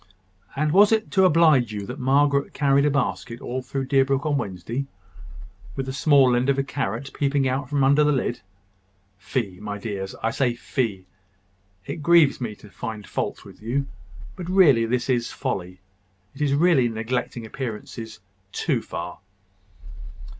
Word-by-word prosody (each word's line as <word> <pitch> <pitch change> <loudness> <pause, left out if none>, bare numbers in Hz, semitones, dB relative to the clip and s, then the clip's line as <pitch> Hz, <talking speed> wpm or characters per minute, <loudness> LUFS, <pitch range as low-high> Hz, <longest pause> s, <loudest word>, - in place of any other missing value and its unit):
And 150 +2 0
was 205 +5 +6
it 220 -1 +1
to 190 -1 +4
oblige 155 -9 +4
you 105 -1 -5
that 125 +7 -7
Margaret 140 +2 +2
carried 140 -1 +3
a - - +3
basket 125 -4 -2
all 130 +1 -4
through 135 +1 -4
Deerbrook 135 +1 +2
on 150 -1 +1
Wednesday, 115 +4 -4 0.9
with 135 - -3
the 130 - -5
small 140 -3 +4
end 125 +3 +1
of 140 - +2
a 135 - +1
carrot 135 -2 -4
peeping 140 -1 +1
out 130 +1 -2
from 140 -1 +1
under 140 +3 +5
the 150 - +3
lid? 125 -3 -1 0.8
Fie, 100 -3 -3
my 105 -1 -5
dears! 100 -2 -5
I 115 - +2
must - - -7
say 125 -3 +2
fie! 115 -7 -3 0.8
It - - -5
grieves 165 -4 +4
me 110 -3 -4
to 105 0 -16
find 110 -4 -6
fault - - -4
with - - -14
you: 130 +6 -1 0.5
but 180 -2 -7
really 145 -12 +5
this 120 +1 -1
is 120 -3 0
folly. 90 -8 -4 0.5
It - - -11
is 140 -1 +2
really 150 -6 +4
neglecting 115 +1 -3
appearances 110 -2 -7 0.3
too - - -1
far." 85 +1 -7
130 Hz, 165 wpm, -24 LUFS, 115-140 Hz, 0.9 s, was